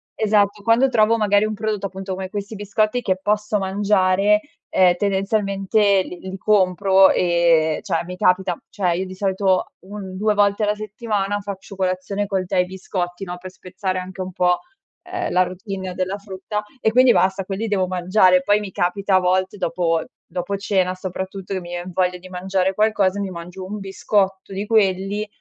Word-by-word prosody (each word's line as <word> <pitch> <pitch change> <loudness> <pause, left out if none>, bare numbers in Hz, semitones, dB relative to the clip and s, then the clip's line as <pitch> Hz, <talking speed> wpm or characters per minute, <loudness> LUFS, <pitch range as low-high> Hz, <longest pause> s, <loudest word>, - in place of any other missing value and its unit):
Esatto. 210 -1 +2
Quando 230 +5 +3
trovo, 225 -1 +3
magari, 205 -1 +3
un 215 0 -3
prodotto, 210 -2 -2
appunto, 190 0 -6
come 185 0 -5
questi 205 +1 -5
biscotti 215 +3 0
che 185 -5 0
posso 210 +1 0
mangiare, 200 +1 +2 0.3
ehm, 180 -1 +4
tendenzialmente 195 0 +1
li 180 - -9
li 190 0 -7
compro 190 -1 +4
e 170 -3 +3
cioè, 165 - -1
mi 180 - -7
capita 180 -1 +2
cioè, 185 -4 0
io 180 +3 -1
di 185 - -9
solito 190 -1 0 0.2
un 195 -2 -7
2 210 +2 +1
volte 205 +1 +2
alla 210 0 +1
settimana 210 -1 -2
faccio 200 -1 -8
colazione 190 +2 -2
col 190 -2 -1
tè 180 - 0
e 180 - +3
biscotti, 180 0 -4
no, 180 -1 -5
pe' 185 +1 -8
spezzare 185 0 -4
anche 185 +1 -6
un 185 0 -5
po', 180 0 +2 0.5
uhm, 360 -1 -2
la 180 - +3
routine 190 0 -6
della 185 +2 -2
frutta, 200 +1 -5 0.2
e 220 - +2
quindi, 255 +1 +6
basta 190 -1 +2
quelli 200 +4 -3
devo 190 -3 +1
mangiare. 185 0 +3
Poi 205 +1 +3
mi 205 -2 -6
capita 195 +2 0
a - - +6
volte 185 +2 0
dopo 165 -3 0 0.2
dopo 180 +3 -4
cena 190 -2 0
soprattutto 190 +1 -6
che - - -1
mi 175 -1 -10
vien 175 +1 -5
voglia 180 0 0
di 185 +1 -13
mangiare 190 +1 -1
qualcosa, 205 -2 +2
mi 195 -2 -3
mangio 180 +2 -8
un 210 +2 -5
biscotto 195 0 -1
di 200 +2 -4
quelli, 200 -1 +1
190 Hz, 180 wpm, -21 LUFS, 185-205 Hz, 0.5 s, quindi